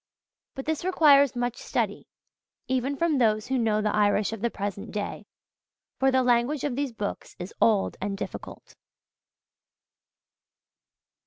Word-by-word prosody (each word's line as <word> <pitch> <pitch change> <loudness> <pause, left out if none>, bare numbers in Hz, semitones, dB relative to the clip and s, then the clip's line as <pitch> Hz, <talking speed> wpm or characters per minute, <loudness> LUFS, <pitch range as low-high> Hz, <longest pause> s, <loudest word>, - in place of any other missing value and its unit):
But 270 - -6
this 315 +1 -2
requires 285 -7 +5
much 245 0 -2
study, - - -2 0.6
even 260 +2 0
from 320 -3 +1
those 215 -3 +2
who 260 0 0
know 215 -2 +1
the 210 - 0
Irish 205 0 +2
of 225 - -7
the 235 - +1
present 200 -2 -5
day; 205 0 -5 0.7
for 270 - +4
the 260 -1 +3
language 245 +4 +2
of 285 -4 -1
these 280 -1 -2
books 210 -3 -5
is 180 +2 -7
old 210 -4 +3
and 195 0 -3
difficult. - - -8
240 Hz, 140 wpm, -26 LUFS, 210-270 Hz, 0.7 s, requires